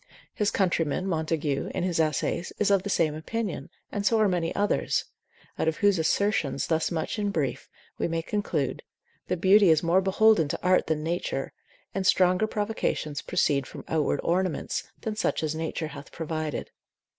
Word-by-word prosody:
His 210 -1 +1
countryman, 175 -3 0
Montague, 155 -5 -1
in - - -1
his 180 -3 0
essays, 160 +2 0
is 205 -1 +2
of 195 -2 +4
the 200 - -5
same 165 -5 +2
opinion, 205 +7 -4 0.2
and 205 - -2
so 225 +2 +3
are 215 - +4
many 175 -3 0
others; 205 0 +1 0.5
out - - +1
of 160 - +1
whose 200 -3 +3
assertions 160 -5 +1
thus 160 -1 +1
much 165 +5 -3
in 205 -1 0
brief 150 -9 -2 0.3
we - - +1
may 165 -1 -2
conclude, 165 -9 -2 0.5
that 180 - 0
beauty 195 +2 +6
is 160 0 +4
more 170 +3 +4
beholden 195 -3 +4
to - - -3
art 185 0 +3
than 155 -1 -1
nature, 170 +2 -2 0.4
and 195 -1 -1
stronger 185 +2 +4
provocations 205 -9 -2
proceed 140 -3 +1
from - - -10
outward 150 -3 0
ornaments, 180 -2 -1 0.2
than 220 -1 -3
such 215 - 0
as 155 -1 0
nature 160 0 -3
hath 140 -2 -10
provided. 155 -2 -4
170 Hz, 170 wpm, -27 LUFS, 155-200 Hz, 0.5 s, beauty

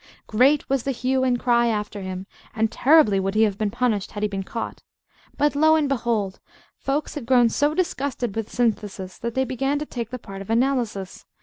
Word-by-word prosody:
Great 265 +7 +3
was 270 -1 +1
the 275 - -4
hue 260 +1 0
and 250 -2 +2
cry 240 -1 +3
after 210 -2 -2
him; 185 0 -5 0.3
and 225 -1 +1
terribly 260 -8 +5
would 195 +1 -2
he 220 - +5
have 205 -3 +2
been 215 -1 +1
punished 225 -3 -1
had 205 - -4
he - - +3
been 195 -1 -4
caught. 225 +4 -5 0.6
But, 290 0 +2
lo 315 +2 +5
and 305 -2 +2
behold, 230 -7 -1 0.4
folks 280 +3 -2
had 270 -6 -6
grown 245 -2 +5
so 290 +6 +1
disgusted 270 - -2
with 225 -1 -3
Synthesis 205 -6 -2
that 235 0 -4
they 265 0 +2
began 270 +3 -1
to 300 - -3
take 235 -6 -5
the 255 - -5
part 195 -4 -9
of 195 - -10
Analysis. 230 -5 -1
235 Hz, 205 wpm, -23 LUFS, 210-270 Hz, 0.6 s, terribly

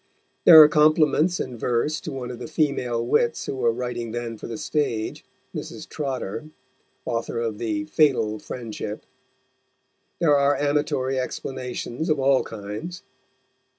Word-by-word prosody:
There 160 -2 +11
are 155 - +11
compliments 155 +3 +3
in 125 -3 -5
verse 125 +7 0
to 160 - -6
one 125 -2 -5
of 120 - -8
the - - -6
female 135 -7 0
wits 120 -1 +1
who - - -3
were 120 -2 +2
writing 120 -1 -4
then 120 -1 -4
for - - -8
the 115 - -5
stage, 115 -7 -2 0.3
Mrs. - - -7
Trotter, 130 -5 -4 0.6
author 115 0 -2
of 115 -3 -3
the 120 +7 -1
Fatal 135 -9 +2
Friendship; 110 -2 -6 1.1
there 150 -4 +4
are 140 0 +3
amatory 140 -2 0
explanations 130 +2 -4
of 155 -2 +2
all 135 0 +4
kinds. 115 - -7
130 Hz, 140 wpm, -24 LUFS, 115-150 Hz, 1.1 s, There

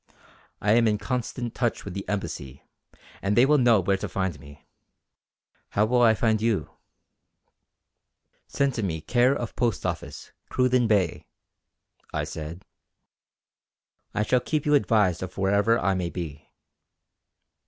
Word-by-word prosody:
I 105 - +2
am 115 +1 +4
in 105 -1 +2
constant 120 +1 -3
touch 120 -2 -1
with 100 - -6
the 100 +1 -6
Embassy 75 -9 -5 0.6
and 100 +1 0
they 120 - +7
will 150 +1 +4
know 120 -4 +5
where 95 +1 +1
to - - -5
find 95 -6 -2
me. 70 +1 -15 1.1
How 105 - +3
will 120 +2 +2
I 115 -2 +5
find 110 -1 +1
you?" 115 -3 0 1.8
"Send 140 -1 0
to 115 - -3
me 85 -6 -2
care 125 - +3
of 120 -4 -5
Post 120 -5 -1
office, - - -5 0.2
Cruden 125 -2 +2
Bay," 100 -6 +1 0.8
I 75 - -2
said, 80 +3 -7 1.5
"I 105 - 0
shall 125 +4 +2
keep 150 +4 -2
you 150 - +2
advised 105 - +3
of 95 0 -7
wherever 100 +4 +3
I 100 -4 +1
may 90 -2 -2
be." 80 -3 -7
105 Hz, 145 wpm, -26 LUFS, 95-120 Hz, 1.8 s, they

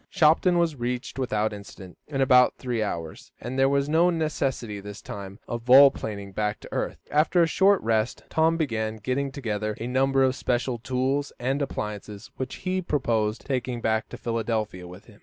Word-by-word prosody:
Shopton 175 +1 +4
was 170 -3 +1
reached 125 +1 -4
without 110 -4 0
incident, 100 -2 -11
in 135 -3 -2
about 125 -1 +5
three 120 -3 -2
hours, 85 -6 -5
and 125 +3 -4
there 135 0 +5
was 140 0 +1
no 165 +4 +4
necessity, 135 - -2
this 100 +1 -9
time, 100 -1 -8
of 120 -1 -4
vol 135 +3 +8
planing 100 -5 -6
back 105 +2 -2
to - - -11
earth. - - -2
After 160 +4 +4
a - - +5
short 195 +4 +4
rest, 110 0 0
Tom 160 +1 +2
began 110 -8 -1
getting 130 +6 -2
together 110 -6 -3
a 115 - -4
number 135 +2 +2
of 130 -1 +3
special 125 -1 -1
tools 130 +4 -1
and 135 +4 -1
appliances, 105 -4 -5
which 130 -1 -4
he 185 0 0
proposed 115 -9 -1
taking 125 -3 -2
back 110 -1 0
to - - -8
Philadelphia 110 -5 -2
with 90 +4 -12
him. 105 -3 -18
125 Hz, 180 wpm, -26 LUFS, 110-140 Hz, -, vol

